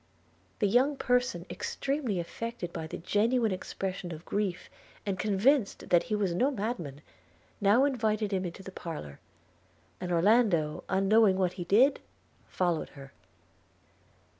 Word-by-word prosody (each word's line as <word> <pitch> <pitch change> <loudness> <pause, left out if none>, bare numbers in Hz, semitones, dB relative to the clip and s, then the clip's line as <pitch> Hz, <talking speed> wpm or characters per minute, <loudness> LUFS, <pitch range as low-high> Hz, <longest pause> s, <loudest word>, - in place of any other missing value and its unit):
The 205 - +2
young 260 +7 +3
person, 245 -10 0
extremely 270 -9 -2
affected 180 +1 -5
by 160 - -5
the - - -6
genuine 220 +5 +1
expression 185 -1 -4
of 160 +1 -8
grief, 200 -3 -2 0.4
and 195 -2 -2
convinced 215 +4 +1
that 175 -1 +5
he 215 - +1
was 200 -4 0
no 250 +10 +2
madman, 200 - -4 0.6
now 210 +7 +5
invited 215 -6 0
him 190 -1 0
into 180 +2 -6
the 190 - -8
parlour; 150 - -7 0.8
and 180 -1 -4
Orlando, 175 -4 +3
unknowing 195 +1 +4
what 185 -2 +1
he 180 -2 -6
did, 245 +10 +4 0.5
followed 175 -3 -1
her. 135 0 -11
195 Hz, 135 wpm, -29 LUFS, 175-230 Hz, 0.8 s, that